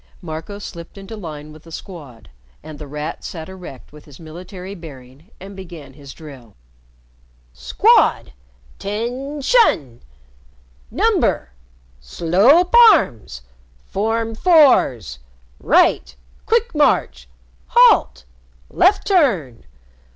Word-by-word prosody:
Marco 165 +3 -8
slipped 170 -3 -11
into 195 +3 -10
line 155 -6 -9
with 155 - -15
the 165 - -17
Squad, 150 - -11 0.4
and 155 -1 -11
The 150 - -9
Rat 150 +2 -7
sat 160 -2 -8
erect 180 -9 -12
with 150 - -15
his 145 -3 -16
military 180 +4 -10
bearing 145 -2 -14
and 195 +1 -11
began 170 -7 -12
his 140 -1 -13
drill: 135 -9 -14 1.0
"Squad! 65 - +1 0.5
"'Tention! 245 - -1 0.9
"Number! 60 - 0 0.5
"Slope 195 - +2 0.2
arms! 85 - -2 0.4
"Form 225 +3 -2
fours! 220 - +2 0.4
"Right! 65 - +1 0.3
"Quick 465 +1 0
march! 295 -2 0 0.4
"Halt! 485 -1 +3 0.5
"Left 370 +3 +2
turn! 205 - 0
170 Hz, 100 wpm, -19 LUFS, 145-225 Hz, 1.0 s, Halt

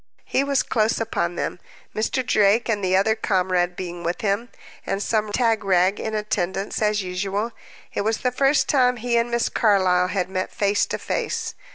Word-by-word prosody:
He 270 - +1
was 280 -1 +1
close 220 0 +1
upon 175 -6 -1
them, 180 - -3 0.4
Mr. 235 +4 -1
Drake 210 +2 +3
and 210 -4 -1
the 185 0 +2
other 200 +3 +3
comrade 185 -4 0
being 175 -1 -6
with 170 +1 -2
him, 210 +3 -1 0.3
and 195 - -2
some 215 -2 0
tagrag 205 -5 +2
in 220 0 -3
attendance, 200 -2 -2
as 210 -1 +1
usual. 195 +5 -2 0.4
It - - -1
was 220 +2 0
the 250 - +1
first 275 +3 +2
time 250 -3 +3
he 240 +1 -1
and 235 0 +2
Miss 235 0 +1
Carlyle 185 -4 +3
had 185 -1 -1
met 185 0 -3
face 205 0 +1
to - - -3
face. - - -3
210 Hz, 180 wpm, -23 LUFS, 185-230 Hz, 0.4 s, Drake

